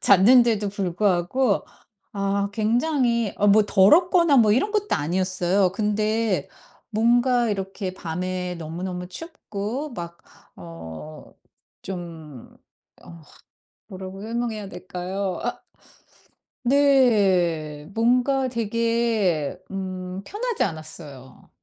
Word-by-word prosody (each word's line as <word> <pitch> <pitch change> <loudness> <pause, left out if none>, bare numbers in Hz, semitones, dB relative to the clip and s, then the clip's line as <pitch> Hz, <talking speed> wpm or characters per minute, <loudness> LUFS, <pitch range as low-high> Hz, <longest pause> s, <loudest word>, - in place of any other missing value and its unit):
잤는데도 215 +1 +5
불구하고 195 +4 0 0.5
아 200 0 -1
굉장히 235 0 +1
어 205 - +2
뭐 210 +1 +6
더럽거나 315 - +5
뭐 215 -3 +5
이런 280 - +1
것도 415 -1 0
아니었어요. 185 +3 +1
근데 210 -3 0 0.4
뭔가 240 +2 +2
이렇게 195 -1 -4
밤에 180 +1 -4
너무너무 180 +2 -5
춥고 265 - -6
막 170 0 -7 0.4
어 80 -2 -10 0.5
좀 165 -8 -9 0.5
어 170 -1 -13 0.7
뭐라고 190 -1 -8
설명해야 225 -2 -3
될까요? 185 +1 -4
아. - - -3 1.0
네. 195 - +3
뭔가 250 +3 +2
되게 230 - 0
음 185 -1 -5
편하지 460 - -2
않았어요. 155 -6 -9
200 Hz, 195 characters per minute, -24 LUFS, 180-235 Hz, 1.0 s, 뭐